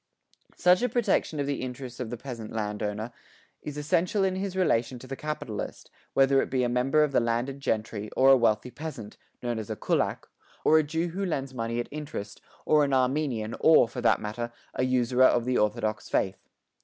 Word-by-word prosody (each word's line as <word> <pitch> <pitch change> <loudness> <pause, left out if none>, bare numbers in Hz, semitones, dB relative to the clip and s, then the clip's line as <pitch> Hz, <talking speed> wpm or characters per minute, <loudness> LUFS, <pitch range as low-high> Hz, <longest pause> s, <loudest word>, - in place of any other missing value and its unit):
Such 180 +3 +4
a 250 - +1
protection 210 -9 +1
of 140 - 0
the 140 0 -2
interests 125 -1 -6
of 125 -3 -4
the 120 - -5
peasant 115 -3 -7
landowner 105 +1 -3 0.5
is 150 -1 -6
essential 170 +7 +1
in 190 -1 +1
his 190 0 -3
relation 125 -9 +1
to 125 - -11
the 135 +1 -5
capitalist, 145 -8 -5 0.2
whether 135 0 +5
it - - -3
be 130 -1 +1
a - - +2
member 135 +5 +3
of 150 - 0
the 135 - +3
landed 120 +4 -1
gentry 110 -4 -2
or 135 +1 +6
a - - +9
wealthy 115 0 +1
peasant, 140 -9 -7 0.3
known 120 -2 -1
as 110 - -7
a - - -2
Kulak, - - -1 0.4
or 155 - +6
a - - +2
Jew 160 +3 -2
who 190 +4 -4
lends 135 -7 -2
money 115 -1 -2
at 120 - -3
interest, 145 -10 -6 0.2
or 150 -1 +4
an 140 -1 0
Armenian 130 -4 0
or, 160 -7 +6
for - - -6
that - - +3
matter, 120 +3 -4 0.2
a - - -1
usurer 130 0 +3
of 120 -2 +3
the 125 0 +1
Orthodox 105 0 -1
faith. 95 0 -1
130 Hz, 200 wpm, -27 LUFS, 115-150 Hz, 0.5 s, a